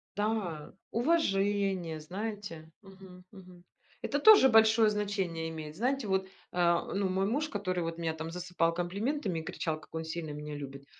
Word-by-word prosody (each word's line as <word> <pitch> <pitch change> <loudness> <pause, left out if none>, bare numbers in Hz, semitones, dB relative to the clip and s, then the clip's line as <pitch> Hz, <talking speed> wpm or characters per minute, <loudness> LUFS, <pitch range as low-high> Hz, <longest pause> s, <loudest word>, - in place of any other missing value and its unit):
Да, 205 -7 -2 0.2
уважение, 200 - +1
знаете 185 -2 -6
Мгм 190 -2 -14
мгм. 185 -3 -14 0.4
Это 285 - 0
тоже 415 -5 +8
большое 220 -2 +6
значение 195 -6 -2
имеет. 155 -1 -7
Знаете, 250 +4 0
вот, 190 -1 0 0.2
а, 170 -1 +2
ну, 195 -1 0
мой 190 +1 +1
муж, 290 +9 0
который 185 - -2
вот 165 0 -4
меня 165 -1 -1
там 160 +1 -6
засыпал 175 -1 0
комплиментами 195 - -2
и - - -5
кричал, 160 -2 -3
как - - -19
он 160 - -2
сильно 160 0 -5
меня 150 0 -6
любит, 140 -1 -8
185 Hz, 160 wpm, -31 LUFS, 165-210 Hz, 0.4 s, тоже